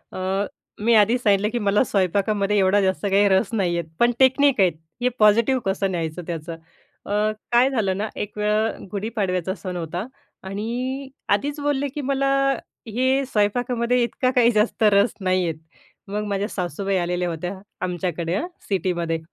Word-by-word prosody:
अ, 190 +2 -1 0.4
मी 230 +1 +4
आधीच 225 +4 +4
सांगितलं, 205 0 +3
की 240 - -1
मला 205 0 +2
स्वयंपाकामध्ये 200 +1 +1
एवढा 195 +1 +4
जास्त 190 +1 0
काही 200 +1 +4
रस 190 +2 +3
नाहीयेत. 175 -6 0
पण 240 0 +4
टेक्निक 265 -2 +4
आहेत 180 -3 +4 0.3
हे 250 - +4
पॉझिटिव्ह 230 +5 +4
कसं 195 0 0
न्यायचं 170 -1 -3
त्याचं. 170 -1 -5 0.5
अ, - - -8 0.4
काय 245 +3 +5
झालं 200 -7 0
ना, 215 +1 -2
एक 210 0 -5
वेळा 210 +1 +2
अ, - - -6
गुढीपाडव्याचा 195 -4 -2
सण 185 -2 -6
होता. 175 +5 -4 0.4
आणि 245 +7 -4 0.2
आधीच 285 +9 0
बोलले, 285 -1 0
की 295 +3 -6
"मला 275 0 0 0.6
हे 260 +5 +1
स्वयंपाकामध्ये 245 +2 +1
इतका 245 +2 0
काही 245 -2 +4
जास्त 215 0 +1
रस 200 +3 +4
नाहीयेत". 185 -3 +1 0.5
मग 210 +1 -2
माझ्या 200 +1 -1
सासूबाई 190 +1 -2
आलेल्या 180 0 -1
होत्या, 175 +3 -4 0.3
आमच्याकडे 175 -1 -2
हां, 345 - -2 0.2
सिटीमध्ये 175 -4 -1
205 Hz, 155 wpm, -23 LUFS, 185-240 Hz, 0.6 s, काय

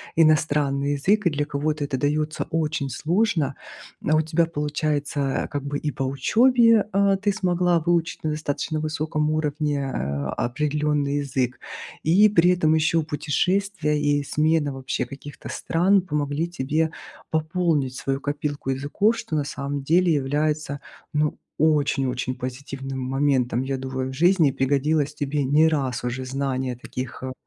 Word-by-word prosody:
иностранный 145 -3 +2
язык 195 +7 +2
и - - +5
для 145 -1 -1
кого-то 150 +1 -2
это 140 -2 -2
даётся 150 +3 -1
очень 155 -3 -1
сложно. 165 - 0 0.5
А 155 - +4
у 155 - +4
тебя 160 +2 +1
получается, 150 -1 -2 0.3
э, - - -7
как 145 -1 -4
бы 145 0 -3
и 150 - -2
по 135 - -3
учёбе, 230 - +4
а, 200 0 +3
ты 205 +1 0
смогла 180 -3 +1
выучить 170 0 0
на 155 - 0
достаточно 155 +1 -2
высоком 155 0 -1
уровне, 150 -2 -1
а, 70 0 -2
определённый 150 +2 0
язык. 130 -2 -2 0.4
И 190 +7 +6
при 180 -3 +4
этом 155 -3 +2
ещё 160 +1 +2
путешествия 155 +3 0
и 145 0 +2
смена 150 0 +1
вообще 130 -1 -3
каких-то 140 +3 -10
стран 190 +4 +2
помогли 150 -2 -2
тебе 160 -1 -1 0.4
пополнить 160 -4 0
свою 135 +1 -2
копилку 145 -1 -3
языков. 150 - +1
Что 165 - -4
на 150 - +1
самом 140 0 -4
деле 175 +4 +3
является 150 0 0 0.3
ну 150 0 0 0.2
очень-очень 135 -4 +1
позитивным 135 +1 -6
моментом, 130 -2 +1
я 135 0 -2
думаю, 130 0 -4
в - - -6
жизни. 170 +1 +4
И - - -2
пригодилось 140 +2 +1
тебе 145 0 -1
не 150 +4 +4
раз 135 -6 -1
уже 125 +2 -3
знание 130 -1 -2
таких, 125 +2 -7
э, 130 - -3
150 Hz, 150 wpm, -24 LUFS, 135-160 Hz, 0.5 s, И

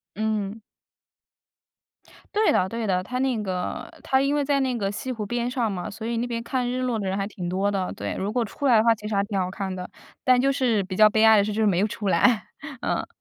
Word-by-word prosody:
嗯。 215 0 -2 1.7
对 430 0 +4
的 185 - +2
对 230 +2 -4
的， 185 -2 +1
它 250 +6 -5
那 255 -4 0
个 185 -3 -4
它 265 - +2
因 275 +2 +1
为 290 - +1
在 280 0 +1
那 255 -3 0
个 195 -2 -1
西 215 +5 -5
湖 225 -4 -3
边 240 +3 -2
上 240 -4 -1
嘛， 180 +1 -4
所 220 +2 -8
以 235 0 -1
那 240 +1 -1
边 230 -1 -3
看 250 -1 -1
日 255 +1 -2
落 245 -3 -1
的 195 - -3
人 190 +1 -1
还 195 - -1
挺 190 -3 -6
多 195 +3 0
的， 190 -2 -2
对， - - -4
如 195 +2 -2
果 240 0 +1
出 255 +6 -5
来 245 - +6
的 215 - +4
话 230 0 +5
其 210 -1 -8
实 210 - -2
还 200 - +2
挺 200 -1 -2
好 185 -1 -1
看 190 0 -4
的， 180 0 -6 0.4
但 255 -1 +5
就 275 +2 +3
是 240 -7 +1
比 185 0 -6
较 215 0 +7
悲 220 +1 +2
哀 220 -1 +7
的 200 - +4
是 210 - -2
就 220 - -1
是 220 - +4
没 185 -3 +2
有 210 - +2
出 205 -1 -3
来， 235 0 +3 0.4
嗯。 - - -1
220 Hz, 280 characters per minute, -25 LUFS, 200-245 Hz, 1.7 s, 较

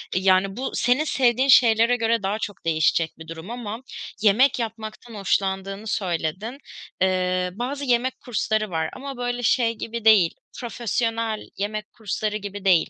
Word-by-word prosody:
yani, 190 +1 +3
bu 265 - -3
senin 250 +5 +2
sevdiğin 260 -3 +2
şeylere 235 -2 +6
göre 230 -2 +1
daha 200 +3 -1
çok 205 -5 -6
değişecek 160 0 +2
bir 160 - -10
durum 165 +4 -8
ama 235 -1 -5 0.4
yemek 250 +6 +4
yapmaktan 225 0 -6
hoşlandığını 195 +1 -1
söyledin. 190 - -2 0.4
Eee, 185 -1 +1
bazı 265 +7 -4
yemek 250 0 +1
kursları 215 -2 -1
var 160 -2 -1
ama 275 0 -7
böyle 245 0 -2
şey 230 0 +3
gibi 230 0 -5
değil, 200 -7 +6 0.2
profesyonel 230 -2 -2
yemek 210 +1 -3
kursları 215 0 -2
gibi 205 -1 -7
değil. 180 -4 +4
215 Hz, 145 wpm, -24 LUFS, 190-240 Hz, 0.4 s, şeylere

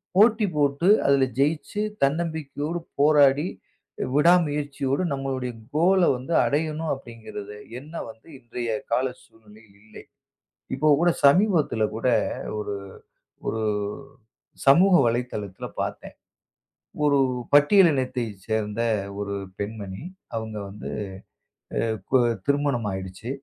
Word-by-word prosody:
போட்டி 215 +1 +5
போட்டு 145 +4 +1 0.2
அதுல 140 -1 +4
ஜெயிச்சு 150 +8 0 0.2
தன்னம்பிக்கையோடு 155 +1 -1 0.2
போராடி, 145 0 +5 0.7
விடாமுயற்சியோடு 150 -2 +2
நம்மளுடைய 135 -2 -3 0.2
கோல்ல 180 +3 +4
வந்து 135 +7 -5
அடையணும் 155 +1 -1
அப்படிங்கறது 110 -5 -9 0.2
எண்ணம் 150 +4 -14 0.2
வந்து 110 +5 -14
இன்றைய 120 -1 -5 0.2
கால 130 +3 +2 0.2
சூழ்நிலையில் 105 -2 -20
இல்லை. 110 - -13 0.7
இப்ப 150 +2 +3
கூட 175 - +4 0.2
சமீபத்துல 150 - +4
கூட, 115 +3 -1 0.5
ஒரு 105 -1 -3 0.7
ஒரு 110 -1 -1 1.0
சமூக 180 +7 +7
வலைத்தளத்துல 115 -5 -3
பார்த்தேன். - - -5 0.9
ஒரு 140 -1 +4 0.4
பட்டியலினத்தைச் 130 - +3
சேர்ந்த 110 0 -1 0.4
ஒரு 100 0 -3 0.3
பெண்மணி. 100 -1 -5 0.3
அவங்க 110 -1 -4
வந்து 105 +1 -8 0.9
அ - - +2 0.3
கு 130 - +6 0.3
திருமணம் 140 -6 +1
ஆயிடுச்சு. 95 +5 -7
140 Hz, 95 wpm, -25 LUFS, 110-155 Hz, 1.0 s, சமூக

